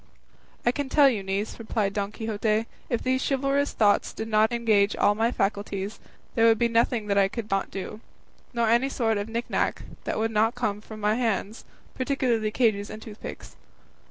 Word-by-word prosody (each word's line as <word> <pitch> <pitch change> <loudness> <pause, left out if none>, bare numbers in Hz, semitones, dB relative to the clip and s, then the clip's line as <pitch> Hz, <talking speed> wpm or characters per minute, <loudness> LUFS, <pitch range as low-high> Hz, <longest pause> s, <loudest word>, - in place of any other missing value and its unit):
"I 240 - +5
can 280 +1 -3
tell 285 0 +6
you, 230 -7 +1
niece," 195 +4 -3
replied 215 -3 -1
Don 200 0 -2
Quixote, 220 0 -1 0.2
"if 235 - -1
these 260 0 +1
chivalrous 275 +1 +1
thoughts 205 -2 +2
did 220 - -5
not 215 +1 +3
engage 220 -4 +2
all 205 - +3
my 225 +3 +1
faculties, 200 -1 -2 0.3
there 230 0 +4
would 225 -1 +5
be 235 - +3
nothing 230 -1 +1
that 200 -1 +2
I 195 - +5
could 215 +1 -6
not 195 0 0
do, 195 +3 -6 0.5
nor 235 -2 +1
any 240 +4 +3
sort 225 -5 0
of 205 +2 -4
knickknack 235 +2 -1 0.2
that - - -2
would 225 +1 0
not 220 +2 +2
come 210 -4 -2
from 215 0 -10
my 210 +1 +2
hands, 225 -2 -2 0.3
particularly 250 -5 0
cages 215 -3 +1
and 215 - -7
tooth 220 -1 -11
picks." - - -8
220 Hz, 185 wpm, -26 LUFS, 205-235 Hz, 0.5 s, tell